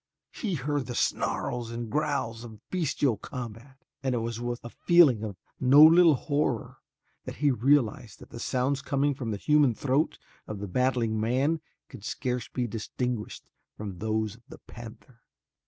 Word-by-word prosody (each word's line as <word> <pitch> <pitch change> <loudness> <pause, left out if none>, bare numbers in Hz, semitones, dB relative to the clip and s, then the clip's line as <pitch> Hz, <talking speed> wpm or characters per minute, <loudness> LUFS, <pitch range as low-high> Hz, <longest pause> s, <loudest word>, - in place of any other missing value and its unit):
He 200 -7 -3
heard 145 -1 -2
the 120 - -5
snarls 120 0 -1
and 115 0 -5
growls 140 -4 -1
of 110 -2 -12
bestial 145 - 0
combat, 125 +1 -8 0.3
and 130 -2 0
it - - +1
was 115 0 -3
with 120 0 -4
a 120 - -7
feeling 155 -11 +4
of 100 -4 -5 0.2
no 135 +4 +7
little 165 0 +7
horror 145 -4 -1 0.5
that - - -6
he 145 -1 +2
realized 120 -4 +1
that - - -15
the 120 - -8
sounds 130 +3 0
coming 140 0 +1
from 130 -4 -5
the 105 - -2
human 145 0 +3
throat 140 +5 0 0.3
of 105 - -5
the 100 +1 -5
battling 120 0 0
man 135 +8 +1 0.3
could 100 - -12
scarce 125 0 -3
be 125 - -2
distinguished 115 +1 -4 0.3
from 100 -4 -6
those 110 -1 -1
of - - -23
the - - -10
panther. 115 +1 -12
125 Hz, 165 wpm, -28 LUFS, 115-140 Hz, 0.5 s, no